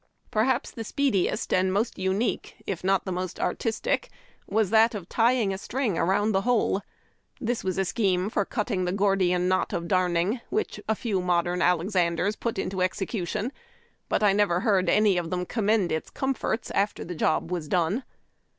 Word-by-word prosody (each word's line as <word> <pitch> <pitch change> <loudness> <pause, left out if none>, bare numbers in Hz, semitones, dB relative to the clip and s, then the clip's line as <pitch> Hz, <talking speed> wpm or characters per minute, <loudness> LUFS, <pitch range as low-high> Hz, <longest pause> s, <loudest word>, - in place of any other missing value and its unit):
Perhaps 235 +4 +1
the 225 - -6
speediest 235 -5 0
and 185 0 +3
most 210 +3 -1
unique, 190 +5 -1
if 185 -3 -4
not 195 0 +2
the 190 - -3
most 180 0 -4
artistic, 230 - -1 0.4
was 210 -1 +1
that 225 +1 +5
of 185 -5 -6
tying 230 -3 +2
a 190 - -5
string 245 -4 -1
around 195 +6 +2
the 195 -1 +2
hole. 230 -4 +1 0.6
This 240 0 -2
was 190 -1 -2
a 195 - +1
scheme 185 -2 +1
for 210 - 0
cutting 200 -2 -2
the 180 - 0
Gordian 190 -3 +2
knot 185 0 +1
of 170 0 -2
darning, 185 +5 +1
which 430 - -2
a 220 - +3
few 205 -5 -1
modern 175 0 +1
Alexanders 180 +2 +1
put 230 0 -3
into 190 0 -2
execution. 190 +4 -2 0.6
But - - +1
I 200 -2 +5
never 195 -3 +2
heaixl 195 -4 +2
any 210 -3 +4
of 165 -2 -4
them 180 0 -2
commend 210 -3 +1
its 160 - -2
comforts 265 -3 -2
after 200 +1 0
the 180 - -5
jcdj 155 +1 +1
was 175 -4 -3
done. 180 - +1
195 Hz, 175 wpm, -26 LUFS, 180-220 Hz, 0.6 s, that